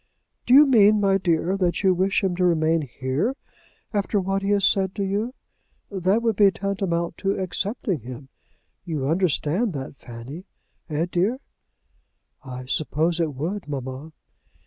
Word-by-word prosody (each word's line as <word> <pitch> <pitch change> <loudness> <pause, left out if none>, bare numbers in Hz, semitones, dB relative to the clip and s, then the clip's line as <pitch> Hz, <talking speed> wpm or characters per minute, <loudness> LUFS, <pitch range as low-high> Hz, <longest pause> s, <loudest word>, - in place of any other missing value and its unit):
"Do 250 - +6
you 295 +2 +9
mean, 215 -5 +5
my 195 -1 +3
dear, 175 +1 +1
that 180 0 0
you 190 -1 +5
wish 190 +3 +1
him 185 -2 0
to 180 - +1
remain 165 -2 +2
here 135 - -2 0.6
after 205 0 0
what 195 +1 -1
he 195 - -2
has 200 -2 +3
said 190 -1 +2
to 200 - -2
you? 210 +6 -2 0.6
That 195 +4 +1
would 225 -2 +1
be 205 -2 +7
tantamount 190 -4 -2
to 195 0 0
accepting 190 - -2
him. 125 +3 -10 0.5
You 155 -6 -3
understand 175 +4 +1
that, 135 -1 -6
Fanny; 125 +10 -9 0.4
eh, 155 +2 0
dear?" 195 +8 +1 1.1
"I 130 -1 -7
suppose 155 +5 0
it 155 -4 -1
would, 175 +8 -4
mamma." 135 +2 -6
180 Hz, 150 wpm, -24 LUFS, 155-200 Hz, 1.1 s, you